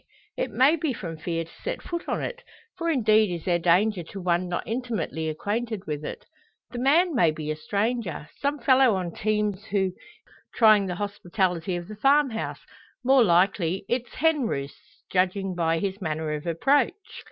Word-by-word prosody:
It - - -2
may 280 +6 +4
be 305 -3 -1
from 165 -7 -6
fear 165 +1 -2
to 165 - -16
set - - -4
foot 340 -1 -5
on - - -1
it; - - -5 0.3
for 335 -1 -2
indeed 220 - +3
is 170 -2 -5
there 175 -2 +2
danger 180 +4 +3
to 185 +4 -9
one 175 0 0
not 175 - -2
intimately 225 -9 -3
acquainted 210 +6 -3
with 150 -1 -4
it. - - -7 0.5
The 245 - -5
man 320 +7 +3
may 175 - +4
be 155 0 -3
a - - -2
stranger 200 0 -2
some 285 +1 0
fellow 260 -5 +4
on 180 -2 -3
teams 210 -1 -1
who 205 - -2
intends 190 -2 0 0.6
trying 215 -4 +5
the 180 - -3
hospitality 185 -3 -1
of 175 0 -5
the 215 - -8
farmhouse 270 -2 +2 0.4
more 260 0 +5
likely 180 -1 +2
its 245 0 -2
henroosts, 255 - -2
judging 190 +1 +1
by 165 -2 +1
his 195 +3 -3
manner 155 -2 -2
of 150 +2 -5
approach? 270 - +2
200 Hz, 175 wpm, -26 LUFS, 170-245 Hz, 0.6 s, trying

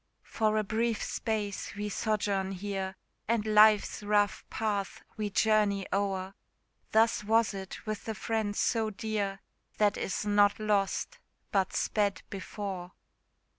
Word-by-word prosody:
For 215 -1 0
a 215 - +2
brief 225 +2 0
space 210 -4 -3
we 205 +1 -3
sojourn 200 -2 0
here, 190 0 -4 0.3
And 225 -1 +1
life's 215 -1 +5
rough 205 0 +1
path 205 -3 -2
we 210 -1 -2
journey 205 -1 +2
o'er; 195 -1 -1 0.6
Thus 225 0 +3
was 225 +1 +3
it 190 +2 -7
with 215 -1 -4
the 220 - -3
friend 220 -2 -1
so 225 0 +1
dear, 205 -2 -3 0.4
That 205 -2 +3
is 195 - -2
not 205 0 +4
lost, 210 - 0 0.3
but 190 -2 +1
sped 205 -2 0
before. 190 -1 -5
205 Hz, 130 wpm, -30 LUFS, 195-215 Hz, 0.6 s, life's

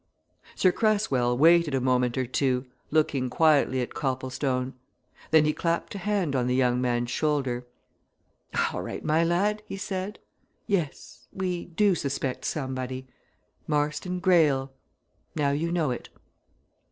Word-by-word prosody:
Sir 185 - +4
Cresswell 175 - +1
waited 165 0 +5
a - - +2
moment 125 -1 +1
or 130 - +1
two, 130 0 0 0.2
looking 145 -4 +1
quietly 145 -3 +3
at 125 - -4
Copplestone. 130 -1 -2 0.6
Then 155 -1 +5
he 150 - +2
clapped 170 +1 -1
a 200 - -5
hand 190 -7 0
on 125 -1 +1
the 125 - +1
young 125 -1 +2
man's 120 -1 0
shoulder. 135 -5 -1 1.1
"All - - -3
right, - - -6
my 160 +2 +3
lad," 200 +5 +1
he 195 - -5
said. 190 +1 -4 0.5
"Yes! 175 -8 -3
we 180 -2 -3
do 195 +3 +2
suspect 140 -5 -3
somebody. 130 -2 -3 0.6
Marston 150 +4 -1
Greyle! 150 -8 +3 0.6
Now 145 -3 +1
you 160 +4 -1
know 165 -6 +1
it." 120 - -6
145 Hz, 135 wpm, -27 LUFS, 130-175 Hz, 1.1 s, waited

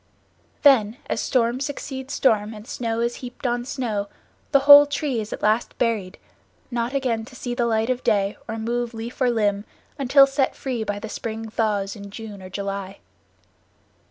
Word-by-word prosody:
Then, 240 -6 +5
as - - -2
storm 240 -1 +1
succeeds 270 -1 -5
storm 220 -4 +2
and 210 0 -10
snow 230 -1 -2
is 235 0 -1
heaped 250 +1 -9
on 240 0 0
snow, 230 -7 -2 0.4
the 275 - +5
whole 285 +1 +10
tree 285 -4 -1
is 210 - -7
at - - -6
last 215 +3 +1
buried, 215 -6 -1 0.5
not 240 +2 -2
again 245 -5 0
to 255 - -14
see 245 -1 -4
the 240 -1 0
light 225 +1 +1
of 255 0 -3
day 200 -1 +1
or 225 - -4
move 235 +1 -2
leaf 230 +4 -7
or 250 - +4
limb 205 -3 +1 0.4
until 275 +1 +6
set 270 -1 0
free 250 -4 -3
by 205 -1 -3
the 210 - -6
spring 225 0 -5
thaws 205 -3 -1
in 200 -1 -9
June 210 -1 -9
or 185 - -9
July. 195 0 -5
230 Hz, 180 wpm, -23 LUFS, 210-255 Hz, 0.5 s, whole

